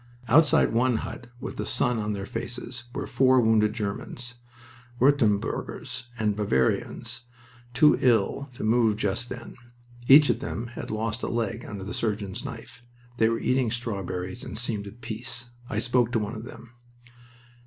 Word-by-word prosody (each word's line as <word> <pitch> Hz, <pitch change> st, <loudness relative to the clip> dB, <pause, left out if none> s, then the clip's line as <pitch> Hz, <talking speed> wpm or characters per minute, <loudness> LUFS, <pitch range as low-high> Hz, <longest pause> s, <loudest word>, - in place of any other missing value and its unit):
Outside 145 Hz, -1 st, +5 dB
one 125 Hz, +1 st, +3 dB
hut, 120 Hz, -, -8 dB
with -, -, -6 dB
the -, -, -2 dB
sun 120 Hz, -2 st, +1 dB
on 105 Hz, 0 st, -1 dB
their 100 Hz, -1 st, -4 dB
faces, 120 Hz, +2 st, -6 dB
were -, -, -2 dB
four 130 Hz, -1 st, +4 dB
wounded 110 Hz, -2 st, +3 dB
Germans, 120 Hz, +3 st, -5 dB, 0.7 s
Wurtemburgers 130 Hz, 0 st, +1 dB
and 105 Hz, -2 st, +1 dB
Bavarians, 110 Hz, -, 0 dB, 0.5 s
too 150 Hz, +4 st, +6 dB
ill 125 Hz, +3 st, +2 dB
to -, -, -6 dB
move 110 Hz, -1 st, +3 dB
just 110 Hz, +3 st, -1 dB
then. 120 Hz, -1 st, -8 dB, 0.5 s
Each 145 Hz, +2 st, +8 dB
of -, -, -2 dB
them 120 Hz, -3 st, -4 dB
had -, -, -6 dB
lost 110 Hz, +2 st, -2 dB
a -, -, -2 dB
leg 115 Hz, 0 st, -2 dB
under 100 Hz, -2 st, -6 dB
the 105 Hz, -, -5 dB
surgeon's 105 Hz, -4 st, -2 dB
knife. 125 Hz, +1 st, -8 dB, 0.4 s
They 110 Hz, -2 st, +4 dB
were 115 Hz, -, 0 dB
eating 130 Hz, -1 st, +1 dB
strawberries, 100 Hz, -4 st, -4 dB
and -, -, -6 dB
seemed 110 Hz, -3 st, -1 dB
at 110 Hz, +4 st, -12 dB
peace. 120 Hz, +2 st, -4 dB, 0.2 s
I 105 Hz, -, -3 dB
spoke 120 Hz, +1 st, +2 dB
to 115 Hz, -, +3 dB
one 105 Hz, +1 st, -3 dB
of 110 Hz, +1 st, -7 dB
them. 120 Hz, -1 st, -11 dB
115 Hz, 160 wpm, -26 LUFS, 105-120 Hz, 0.7 s, Each